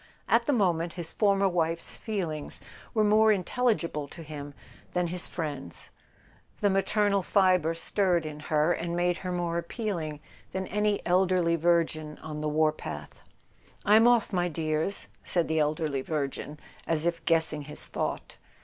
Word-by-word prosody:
At - - +3
the - - +4
moment 175 - +1
his 170 -2 -6
former 200 -2 +3
wife's 170 -2 -1
feelings 170 -9 -4 0.4
were 215 - +4
more 215 +1 +5
intelligible 190 - 0
to 165 - -10
him 145 -2 -8 0.4
than 180 -1 +1
his 175 +1 -2
friend's: 145 - -6 0.7
the 205 - +3
maternal 200 +1 +2
fibre 185 -4 +3
stirred 175 -1 +1
in 150 -1 -6
her, 155 +2 +2
and 170 0 -3
made 175 0 +1
her 185 -1 -4
more 170 -1 -1
appealing 170 - -4 0.3
than 190 0 -2
any 210 +1 0
elderly 180 -2 +3
virgin 160 -2 +1
on 150 -1 -5
the 155 - 0
war 155 +1 +3
path. 155 - -8 0.6
"I'm 220 +3 +6
off, 240 -3 +3
my 175 -1 +2
dears," 160 +3 -1 0.2
said 175 -2 0
the 160 0 +1
elderly 150 -2 0
virgin, 145 0 -3 0.3
as 160 -1 0
if 170 -1 -1
guessing 160 -3 +1
his 150 - -6
thought. - - -4
170 Hz, 150 wpm, -28 LUFS, 155-190 Hz, 0.7 s, I'm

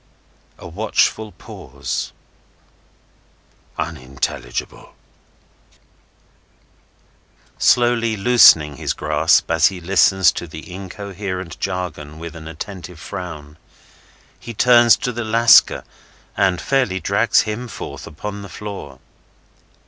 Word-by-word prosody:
A - - -10
watchful 110 +3 0
pause. - - -6 1.7
"Unintelligible!" 65 -2 -5 2.6
Slowly 120 -2 +2
loosening 95 -10 +5
his - - -2
grasp - - +2
as - - +4
he 95 -1 -4
listens 95 +1 +3
to 85 - -7
the 80 +3 -10
incoherent 95 -1 -6
jargon 85 -5 -5
with 85 +1 -8
an 80 -1 -10
attentive 85 +1 -8
frown, 80 -5 -8 0.8
he 115 - -9
turns 120 0 +6
to 125 - -3
the 120 0 -4
Lascar 115 +2 +5 0.5
and 95 -2 +1
fairly 125 -9 0
drags - - +2
him 110 +4 -5
forth - - -8
upon 100 +6 -7
the 100 - -10
floor. 90 -9 -8
95 Hz, 95 wpm, -20 LUFS, 80-110 Hz, 2.6 s, turns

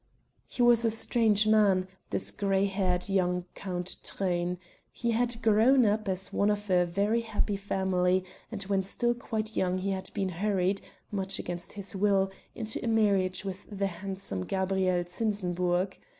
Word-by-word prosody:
He 245 - -1
was 240 -1 +6
a 230 - +3
strange 220 -1 +3
man, 205 -4 +4 0.2
this - - 0
grey 195 -1 +1
haired 185 -2 0
young 180 -2 +1
Count 180 -1 -4
Truyn; 180 -2 -1 0.3
he 235 -1 -1
had 235 0 0
grown 225 +4 +5
up 210 0 +1
as 190 0 -2
one 205 - +2
of 205 -1 -1
a 180 -1 +4
very 205 +6 +1
happy 210 -2 -1
family 190 -2 +1 0.3
and 205 -3 -2
when 195 0 +1
still 240 +5 0
quite 220 -2 -4
young 185 0 +1
he 195 +1 -2
had 190 -1 -3
been 195 -2 0
hurried, 190 +1 0 0.3
much 195 -1 -2
against 175 0 -6
his 200 -1 -5
will, 195 -1 +2 0.2
into 220 -1 -4
a - - -2
marriage 200 -4 +2
with 190 0 -6
the 200 -1 -2
handsome 190 - -4
Gabrielle 190 - 0
Zinsenburg. 180 -2 -1
195 Hz, 160 wpm, -29 LUFS, 185-215 Hz, 0.3 s, was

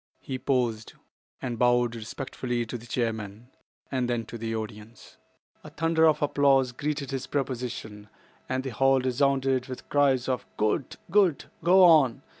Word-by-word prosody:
He 130 -1 -5
paused 120 -5 -1 0.5
and 120 -3 -3
bowed 120 -1 +3
respectfully 120 +1 -4
to 115 - -7
the 120 0 -8
chairman 115 0 -3 0.4
and 130 -2 -1
then 120 -2 -1
to 115 +2 -8
the 115 0 -3
audience. 110 +1 -8 0.5
A - - -10
thunder 165 0 +2
of 155 -1 +2
applause 140 -3 +3
greeted 145 +2 -3
his 135 -2 -4
proposition, 120 -6 -4 0.4
and 130 0 -1
the 135 - -4
hall 135 +3 +3
resounded 130 0 +1
with 130 -1 -8
cries 135 -3 +2
of 130 -3 -2
"Good! 110 +4 0 0.2
good!" 190 -7 +3 0.2
"Go 185 +2 +6
on!" 155 -9 +5
130 Hz, 150 wpm, -27 LUFS, 115-140 Hz, 0.5 s, Go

